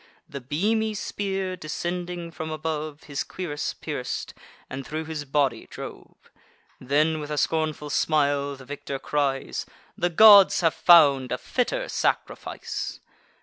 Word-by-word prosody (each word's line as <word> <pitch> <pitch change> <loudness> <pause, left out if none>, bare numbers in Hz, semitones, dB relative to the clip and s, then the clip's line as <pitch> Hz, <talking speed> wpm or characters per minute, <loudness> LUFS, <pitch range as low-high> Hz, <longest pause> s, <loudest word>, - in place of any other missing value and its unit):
The 140 - -7
beamy 215 - 0
spear, 195 -2 -3
descending 175 +1 -4
from 160 0 -6
above, 155 -1 -4
His 140 -2 -3
cuirass 155 -6 -4
pierc'd, - - -5 0.3
and 135 +1 -6
thro' 155 +4 -4
his 155 -2 -5
body 135 -4 0
drove. - - -9 0.6
Then, 150 +4 +1
with 150 -1 -6
a 150 - -3
scornful 155 0 -1
smile, 145 -2 +1
the 130 -1 -13
victor 140 0 -5
cries: 135 -1 -2 0.3
"The 175 - 0
gods 200 +2 +8
have 165 -2 +3
found 140 -7 +6
a 125 - 0
fitter - - -1
sacrifice." - - -3
155 Hz, 130 wpm, -25 LUFS, 145-175 Hz, 0.6 s, gods